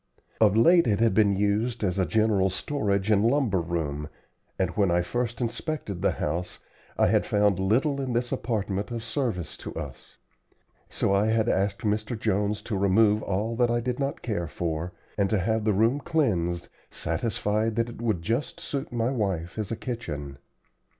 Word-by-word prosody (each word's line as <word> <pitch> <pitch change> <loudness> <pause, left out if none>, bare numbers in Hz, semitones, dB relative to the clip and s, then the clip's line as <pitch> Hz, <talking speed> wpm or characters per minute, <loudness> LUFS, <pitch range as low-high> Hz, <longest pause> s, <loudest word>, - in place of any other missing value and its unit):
Of 110 -1 +4
late 170 +8 +6
it 105 -2 +2
had 115 -3 +3
been 100 -1 +4
used 105 +4 0
as 95 -1 0
a 95 - +2
general 105 +1 +2
storage 100 -1 -1
and 105 -1 +4
lumber 115 -6 +2
room, 80 -3 -3 0.5
and 95 -2 0
when 100 -2 +2
I 85 0 +2
first 115 +5 -2
inspected 115 - -3
the 100 - +2
house, 85 +4 -3 0.4
I - - +4
had - - +3
found 105 -2 +2
little 135 +9 +1
in 130 -2 -2
this 120 +1 -1
apartment 105 -3 -2
of 115 -1 -4
service 115 - -2
to - - -8
us. - - -8 0.7
So 100 - 0
I 100 +2 +3
had 110 0 +2
asked 100 0 0
Mr. 110 +2 -1
Jones 105 -1 0
to 105 - -2
remove 105 +2 +4
all 105 +4 -1
that 120 -1 +3
I 120 0 +2
did 125 +2 -2
not 140 0 -2
care 100 -8 -2
for, 85 +1 -3 0.3
and 100 -1 +3
to 110 - +2
have 110 +3 0
the 110 - +3
room 115 +8 +3
cleansed, 95 - 0 0.2
satisfied 105 +5 -1
that 115 +1 0
it 115 - -9
would 110 -8 0
just 115 - -2
suit 140 +1 -4
my 120 +1 0
wife 95 -7 -2
as 105 - -3
a 115 - -2
kitchen. 75 - -5
105 Hz, 180 wpm, -27 LUFS, 95-115 Hz, 0.7 s, late